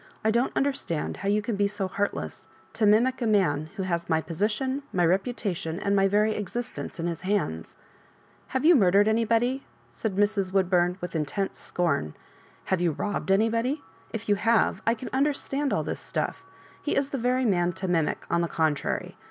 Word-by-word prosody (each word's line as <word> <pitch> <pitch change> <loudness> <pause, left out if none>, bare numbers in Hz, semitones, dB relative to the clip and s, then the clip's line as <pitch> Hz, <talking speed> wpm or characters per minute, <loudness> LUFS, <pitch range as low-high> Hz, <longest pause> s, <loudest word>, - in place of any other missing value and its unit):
I 220 - +4
don't 235 +3 +1
understand 265 - -1
how 195 - -2
you 210 +1 +2
can 225 0 -2
be 200 0 +2
so 200 -1 -3
heartlesa 200 +2 -3 0.3
To 215 - +2
mimic 245 +5 +3
a 235 - +1
man 160 -8 +2
who 195 - -2
has 170 -2 -2
my 160 - +3
position, 210 - -1
my 175 -2 +2
reputation, 185 -3 -1
my 195 -1 +4
very 210 +2 +2
existence 225 -1 -5
in 165 - -2
his 170 -2 -3
hands 185 - -2 0.7
I" - - -14
"Have 260 +2 0
you 345 - +8
murdered 200 -3 +5
anybody?" 230 +4 +2 0.3
said 215 -4 -3
Mrs. 205 -2 +1
Woodburn, 180 -2 +2
with 180 -1 -5
intense 165 +6 -2
scorn. 140 - -1 0.2
" - - -29
Have 190 - +1
foxi 175 -1 +2
rob 205 -1 -2
bed 195 - +4
anybody? 230 +7 +1 0.3
If 225 0 -5
you 205 - +4
have, 230 +2 +2
I 230 - +4
can 240 - -7
understand 280 0 0
all - - +1
this - - -4
stuff. - - -3 0.4
He 295 - -1
is 275 0 0
the 275 - -2
very 250 +2 +1
man 175 -5 +2
to 190 +1 -4
mimic, 165 -4 0
on 170 - +1
the 170 - 0
contrary. 155 -3 -1
205 Hz, 190 wpm, -27 LUFS, 175-230 Hz, 0.7 s, you